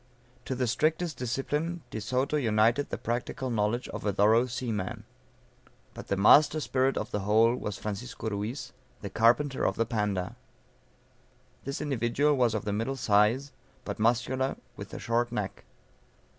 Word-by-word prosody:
To 130 - -2
the 125 0 0
strictest 155 +7 0
discipline 150 +7 -2
De 110 - -4
Soto 130 +7 0
united 115 +1 +2
the - - -3
practical 120 +2 -3
knowledge 115 +2 0
of - - -6
a 105 - +1
thorough 110 +5 +4
seaman. 115 -6 -3 0.9
But - - -9
"the 100 - 0
master 145 +10 +6
spirit 135 -2 +1
of - - -3
the 105 - -1
whole," 110 +4 +3
was 105 -5 -4
Francisco 110 +2 -5
Ruiz, 115 +6 -4 0.3
the 100 - -6
carpenter 120 +6 +3
of 95 - +1
the 115 - +1
Panda. 105 -5 -2 1.3
This 140 +1 -4
individual 140 +1 +1
was 120 -4 +2
of 105 - -3
the 105 - -1
middle 115 +6 -1
size, 115 +4 +2 0.3
but - - -5
muscular, 120 +4 +1 0.2
with - - -9
a - - -6
short 120 +1 0
neck. - - -4
120 Hz, 155 wpm, -29 LUFS, 105-135 Hz, 1.3 s, master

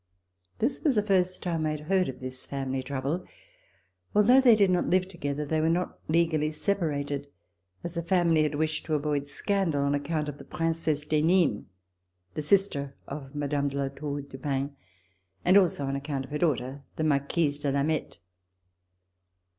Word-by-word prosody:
This 260 +4 -1
was 285 -5 +3
the 210 - +3
first 185 -3 +1
time 170 -3 -1
that 155 - +1
I - - 0
had 155 - -4
heard 185 +2 +1
of 130 - -7
this 130 0 -7
family 135 -1 -2
trouble. 140 +6 -2 0.9
Although 240 +6 +6
they 245 -4 +7
did 200 -3 +4
not 180 - +1
live 185 0 +2
together, 150 -5 -3
they 155 +2 0
were 160 - +2
not 175 +2 -1
legally 155 -2 +2
separated, 145 -5 -1 0.6
as 175 - -3
the 170 - -1
family 170 -2 +3
had 150 -1 0
wished 155 +1 -1
to 155 - +1
avoid 145 -1 -1
scandal 165 -2 0
on 140 0 +1
account 150 +2 -1
of 145 -1 -6
the - - -9
Princesse 165 -3 -1
d'Henin, 155 - +2 0.7
the - - -3
sister 145 -5 +1
of 140 0 -7
Mme. 145 -1 0
de 140 0 -4
La 140 -1 0
Four 145 +1 -4
du 135 -1 -11
Pin, 140 +1 -2 0.7
and 185 - +5
also 175 -8 +4
on 135 0 -2
account 140 -1 -3
of 130 - -16
her 150 - -2
daughter, 140 -4 0
the 155 - -2
Marquise 145 0 +1
de 145 -1 -1
Lameth. 145 +3 -1
150 Hz, 180 wpm, -28 LUFS, 140-175 Hz, 0.9 s, they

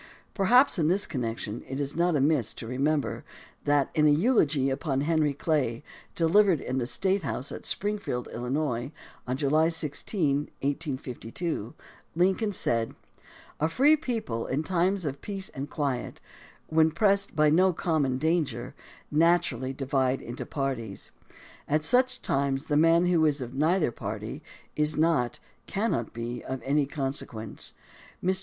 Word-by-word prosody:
Perhaps 240 +3 +4
in 155 - +2
this 190 +5 +2
connection 115 -3 -4
it 135 +1 -4
is 140 0 -3
not 170 0 +2
amiss 140 -5 +2
to - - -7
remember 140 +5 -1 0.4
that, 145 -1 +2
in 150 -2 +4
a - - +6
eulogy 150 - +3
upon 135 0 -1
Henry 155 -1 +2
Clay, 140 -6 0 0.3
delivered 175 +1 +4
in 130 +1 -2
the 120 - -1
State 195 +7 +1
House 140 -3 -3
at - - -6
Springfield, 200 - -2
Illinois, 125 +1 -2 0.4
on 125 +1 -1
July 155 +3 +3
16, 150 -1 -1
1852, 140 - -3 0.4
Lincoln 190 +5 +2
said: 115 - 0 0.6
A 155 - +1
free 275 - +5
people 225 - -3
in 140 +4 -1
times 185 +1 +1
of 140 -1 -4
peace 195 -2 -5
and 140 +1 -6
quiet 135 -5 -3 0.3
— - - -25
when 160 0 +4
pressed 200 +3 +1
by 150 -1 +4
no 185 +4 +5
common 155 -6 0
danger 145 -6 -1 0.2
— - - -27 0.2
naturally 130 -7 +1
divide 135 -1 0
into 120 +2 -7
parties. 130 -8 -4 0.6
At 155 +1 +1
such 255 +7 +2
times 135 0 0
the 145 - 0
man 165 +3 +5
who 175 -3 +3
is 145 -1 +1
of 125 -1 -5
neither 155 +2 +2
party 110 +5 -6 0.3
is 150 0 +1
not, 155 -7 +1 0.3
cannot 200 - -1
be, 120 +1 -5
of 130 0 -4
any 140 +1 +1
consequence. 135 -6 -4 0.5
Mr. 185 +1 +3
150 Hz, 150 wpm, -27 LUFS, 130-170 Hz, 0.6 s, a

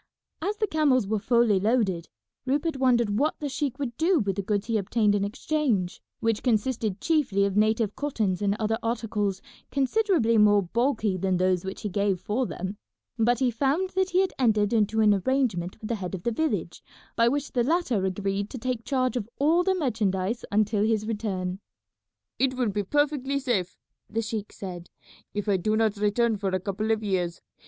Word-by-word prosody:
As 405 +5 -2
the 435 - +1
camels 290 - +2
were 215 +2 -1
fully 235 -2 +3
loaded, 200 -5 0 0.4
Rupert 290 +3 0
wondered 240 -5 +2
what 300 +3 0
the 295 - -3
sheik 275 -1 -2
would 260 -5 -4
do 345 +3 +3
with 200 -5 -1
the 200 - -1
goods 205 +1 -1
he 230 -2 0
obtained 210 +1 +1
in 205 -1 +1
exchange, 225 - -1 0.2
which 225 -2 +1
consisted 220 -4 0
chiefly 260 -12 +2
of 200 -1 -2
native 215 0 +2
cottons 215 -10 -1
and 200 0 +1
other 225 +1 0
articles 210 -4 -2 0.3
considerably 280 - +2
more 205 -1 +5
bulky 220 0 0
than 185 0 0
those 185 -1 +1
which 190 0 -6
he 210 - -1
gave 200 -1 0
for 225 +7 -1
them; 190 +3 -5 0.4
but 240 +2 +3
he 250 0 +1
found 285 - 0
that 380 0 0
he 365 +1 +3
had 380 - -1
entered 215 -4 +2
into 220 0 +2
an 210 -1 +5
arrangement 200 -5 0
with 215 - -7
the - - +1
head 180 +1 -3
of 175 - -8
the 235 - 0
village 315 +7 -2 0.3
by 230 - +4
which 285 +3 -1
the 245 - +1
latter 260 - +1
agreed 195 +1 -2
to - - -7
take 250 -1 -3
charge 255 0 0
of 230 -3 -3
all 320 +5 +3
the 380 +1 +2
merchandise 220 - -1
until 210 0 +2
his 215 -1 +1
return. 195 -4 -3 0.8
"It 260 -1 +2
will 250 -3 0
be 205 +1 -1
perfectly 280 +4 0
safe," 235 -10 -1 0.3
the 225 +1 -1
sheik 215 -1 -4
said, 180 -3 -8 0.5
"if 205 0 -2
I 200 -2 +3
do 215 +4 0
not 220 -2 +2
return 210 +2 +1
for 195 -1 -1
a 185 0 0
couple 200 +3 -3
of 220 -1 +1
years. 180 -4 -1
220 Hz, 190 wpm, -26 LUFS, 200-260 Hz, 0.8 s, more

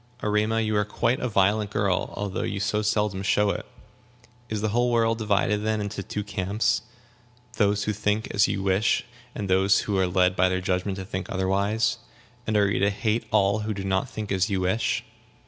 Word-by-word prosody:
"Erema, 105 +1 +1
you 110 -1 0
are 105 - +3
quite 115 +4 0
a 125 - -2
violent 105 +1 +2
girl, 100 -3 0
although 100 -1 -3
you 100 - -3
so 100 +2 0
seldom 105 -2 0
show 100 +1 +2
it. - - -5 0.8
Is 110 -1 -2
the 110 - 0
whole 120 +3 +2
world 115 -1 +2
divided, 105 -1 +1
then, 110 0 0
into 100 -1 -4
two 105 +2 -4
camps 105 +1 0 0.8
those 100 -1 +2
who 105 - -1
think 105 +1 -1
as 100 +1 +4
you 100 -1 -2
wish 95 +3 +2 0.3
and 105 - -3
those 95 +1 +3
who 100 -2 -1
are 95 - +2
led 90 0 +2
by 95 0 +3
their 95 0 0
judgment 95 +1 -1
to 95 - -5
think 95 0 -5
otherwise? 100 +5 0 0.5
And 110 -1 +1
are 100 -1 +4
you - - 0
to 100 - +3
hate 110 +2 -1
all 100 +1 +3
who 110 0 -3
do 100 - -5
not 95 0 0
think 110 -1 -6
as 95 +1 +1
you 95 -2 0
wish?" 95 +5 0
105 Hz, 200 wpm, -25 LUFS, 95-110 Hz, 0.8 s, as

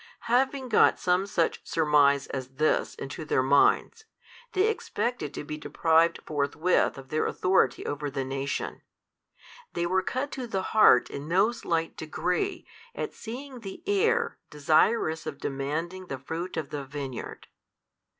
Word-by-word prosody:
Having 260 +2 +1
got - - +5
some 180 +2 +1
such 175 -5 0
surmise 145 -3 +3
as 130 0 -6
this 155 +3 +1
into 135 +4 -6
their 135 -3 +1
minds, 145 - +3 0.5
they 380 +2 +3
expected 245 - -2
to - - -4
be 150 +1 -6
deprived 165 +2 +2
forthwith 150 +4 +1
of 135 0 -11
their 155 +2 0
authority 185 -9 +1
over 145 0 -3
the 135 -1 -3
nation: 135 +1 -3 0.9
they 170 - -1
were 185 +2 +2
cut 260 +9 -3
to 255 -3 -5
the 190 -4 -2
heart 215 - +6
in 140 +2 -6
no 195 +7 +3
slight 165 -8 -2
degree 175 - -2 0.3
at - - -4
seeing 255 +3 -8
the 195 -4 -9
Heir 410 +3 +1
desirous 160 +3 +2
of - - -5
demanding 160 +7 -4
the 135 - -4
fruit 165 +7 -5
of 155 -3 -4
the 145 -1 -4
vineyard. 135 -2 -7
165 Hz, 145 wpm, -27 LUFS, 140-215 Hz, 0.9 s, heart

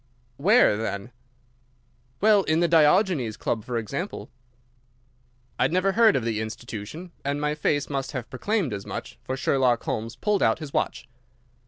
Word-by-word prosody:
"Where, 200 - +4
then?" 105 0 -4 1.1
"Well, 210 -1 +5
in 155 +1 +2
the 175 - +3
Diogenes 155 - +3
Club, 115 -3 -2
for 120 +1 -3
example." 140 - -5 1.3
I - - +4
had - - 0
never 185 +2 +2
heard 225 +1 +5
of 125 - 0
the 110 -2 -1
institution, 115 - -7
and 140 +1 -1
my 150 0 0
face 150 -1 0
must 135 -2 -3
have 125 -3 -4
proclaimed 180 - -1
as 100 -1 -6
much, - - -7
for 130 - -4
Sherlock 125 -1 +2
Holmes 115 +2 -3
pulled 205 +8 0
out 110 - +3
his 155 -3 -8
watch. - - -2
140 Hz, 160 wpm, -25 LUFS, 115-180 Hz, 1.3 s, Well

